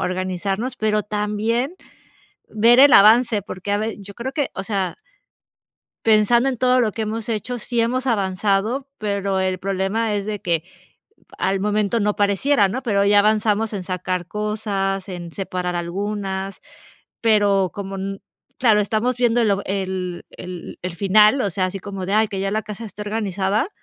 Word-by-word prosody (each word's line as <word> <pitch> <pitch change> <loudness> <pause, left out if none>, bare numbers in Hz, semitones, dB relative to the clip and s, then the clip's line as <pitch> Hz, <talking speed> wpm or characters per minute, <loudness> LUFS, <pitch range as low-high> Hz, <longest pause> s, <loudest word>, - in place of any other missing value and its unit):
organizarnos, 185 +6 -2
pero 215 -1 +1
también 215 - -1 0.8
ver 230 +3 +5
el 280 +1 +8
avance, 220 +1 +6
porque, 185 +1 -6
a 205 - +2
ve 220 +1 -3
Yo 200 0 -10
creo 260 +3 -5
que, 285 -1 -1
o - - -4
sea 195 -4 -2 1.1
pensando 225 +3 +4
en 260 - -1
todo 255 +1 +3
lo 220 -3 +1
que 225 - -3
hemos 220 +1 -4
hecho, 230 +2 -3
sí 235 +1 -1
hemos 255 +3 0
avanzado, 205 +4 0
pero 200 -2 -1
el 185 0 0
problema 195 +4 -1
es 200 -1 -2
de 210 -1 -3
que 165 -2 0 0.8
al 195 +1 +1
momento 210 +2 +1
no 210 0 +1
pareciera, 205 +2 +2
¿no?, 255 +7 -4
pero 200 -5 +1
ya 205 0 +5
avanzamos 215 +1 +1
en 200 -3 -3
sacar 180 -1 -3
cosas, 205 -2 -2
en 175 -2 -7
separar 180 -2 -3
algunas, 195 +2 -3 0.6
pero, 205 -4 +3
como 195 -1 -5
n 195 +1 -5 0.4
claro, 220 -4 +4
estamos 220 +4 0
viendo 240 -1 +2
el 220 - +2
o 200 0 -1
el 185 -2 -3
el 180 -1 -9
el 180 -1 -4
final, 210 +7 +5
o 200 - 0
sea, 185 +1 0
así 190 +1 -5
como 195 -1 -6
de: 195 - 0
"Ay, 215 0 +3
que 195 - -5
ya 195 0 -1
la 215 +1 0
casa 215 +2 -8
esté 210 -1 -8
organizada", 210 - -1
205 Hz, 170 wpm, -21 LUFS, 195-220 Hz, 1.1 s, el